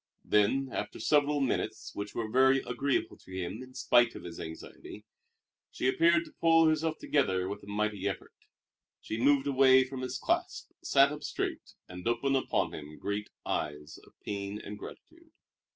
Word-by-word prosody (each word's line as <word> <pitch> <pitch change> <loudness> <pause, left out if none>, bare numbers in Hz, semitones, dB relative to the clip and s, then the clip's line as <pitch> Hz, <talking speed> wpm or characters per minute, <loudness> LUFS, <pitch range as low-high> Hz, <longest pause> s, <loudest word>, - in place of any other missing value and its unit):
Then, 125 +6 +2
after - - -4
several 145 -1 +2
minutes 135 - -2
which 100 0 -6
were 115 - -2
very 130 +4 +4
agreeable 135 +3 -1
to - - -17
him 95 +5 -4
in 130 0 -12
spite 120 -2 +3
of - - -8
his 85 -1 -8
anxiety, 80 0 -9 0.6
she 125 - -2
appeared 170 +5 +4
to - - -15
pull 165 -1 +6
herself 155 0 +1
together 95 -11 +1
with 100 +1 -5
a - - -15
mighty 105 -1 -1
effort. 95 - -7 0.7
She 110 +1 -5
moved 140 +1 +4
away 130 -1 +6
from 130 0 -7
his 130 - -3
clasp, - - -2
sat 140 0 +4
up 150 0 -6
straight, - - -4
and 90 +3 -7
opened 125 +4 +1
upon 135 - 0
him 75 0 -9
great 105 +1 -3 0.2
eyes 75 +1 -4
of - - -22
pain 100 0 -4
and 105 0 -8
gratitude. 335 - -12
125 Hz, 170 wpm, -30 LUFS, 100-140 Hz, 0.7 s, pull